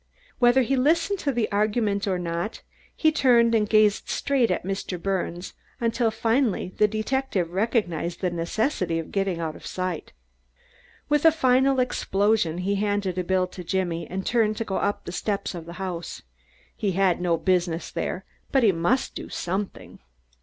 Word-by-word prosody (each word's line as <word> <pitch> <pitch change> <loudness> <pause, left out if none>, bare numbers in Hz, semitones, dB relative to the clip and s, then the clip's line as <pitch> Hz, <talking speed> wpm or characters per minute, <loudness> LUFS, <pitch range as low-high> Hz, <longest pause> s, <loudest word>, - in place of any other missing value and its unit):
Whether 245 +1 +5
he 270 +3 +1
listened 330 +8 +1 0.8
or 185 -2 +1
not 170 +4 -4 0.3
he 315 - +3
turned 240 -6 +4
and 210 -2 +2
gazed 215 -1 +3
straight 275 -4 +1
at 180 - -1
Mr. 195 -2 -3
Birnes 180 -1 -3 0.3
until, 230 0 +1
finally, 225 -2 0
the 210 - +5
detective 215 -4 -1
recognized 180 - -1
the 180 -2 -1
necessity 175 - -1
of 165 - -5
getting 195 -3 -1
out 160 -2 -3
of - - -13
sight. 185 -1 -4 1.0
With 295 0 +2
a 325 - +8
final 265 -2 +3
explosion 205 -7 +1
he 200 - +1
handed 200 -3 -1
a - - 0
bill 185 +1 +1
to 180 - -9
Jimmy 170 -2 -2
and 190 +1 -4
turned 215 -3 +2
to 225 - -2
go 190 - -2
up 200 0 -1
the - - -5
steps 200 +2 -2
of 170 -2 -8
the 170 - -7
house. 180 -2 -5 0.5
He 200 -3 -1
had 185 -1 +2
no 170 -2 +2
business 175 -1 0
there, 190 - -3 0.3
but 270 -2 +3
he 215 - +6
must 180 +10 0
do - - -7
something. 190 +3 -4
200 Hz, 160 wpm, -25 LUFS, 180-235 Hz, 1.0 s, a